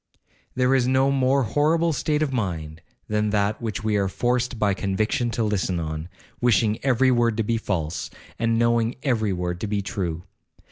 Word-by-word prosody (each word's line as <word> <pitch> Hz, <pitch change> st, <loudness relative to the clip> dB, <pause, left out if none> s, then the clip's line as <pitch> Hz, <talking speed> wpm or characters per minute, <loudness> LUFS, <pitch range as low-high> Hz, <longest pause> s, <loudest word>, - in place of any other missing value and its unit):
'There 125 Hz, +1 st, +2 dB
is 130 Hz, -2 st, +3 dB
no 130 Hz, +1 st, +3 dB
more 135 Hz, 0 st, +2 dB
horrible 160 Hz, +6 st, +2 dB
state 150 Hz, +1 st, 0 dB
of 140 Hz, -3 st, -2 dB
mind 80 Hz, -9 st, -3 dB, 0.3 s
than 105 Hz, 0 st, 0 dB
that 105 Hz, 0 st, +1 dB
in -, -, -13 dB
which 110 Hz, 0 st, -3 dB
we 110 Hz, -1 st, +1 dB
are 100 Hz, -1 st, +1 dB
forced 125 Hz, +5 st, -1 dB
by 105 Hz, -2 st, +2 dB
conviction 110 Hz, +6 st, -1 dB
to 115 Hz, 0 st, -1 dB
listen 95 Hz, -4 st, 0 dB
on, 80 Hz, +1 st, -4 dB, 0.3 s
wishing 110 Hz, -2 st, +2 dB
every 130 Hz, -1 st, +3 dB
word 120 Hz, -3 st, +2 dB
to 115 Hz, -, +1 dB
be 115 Hz, +2 st, 0 dB
false, 85 Hz, -8 st, -3 dB, 0.3 s
and 115 Hz, -1 st, +1 dB
knowing 115 Hz, 0 st, +2 dB
every 110 Hz, -7 st, +1 dB
word 90 Hz, -1 st, -3 dB
to 110 Hz, -, -2 dB
be 100 Hz, -1 st, -1 dB
true. 85 Hz, -4 st, -3 dB
110 Hz, 185 wpm, -24 LUFS, 100-125 Hz, 0.3 s, is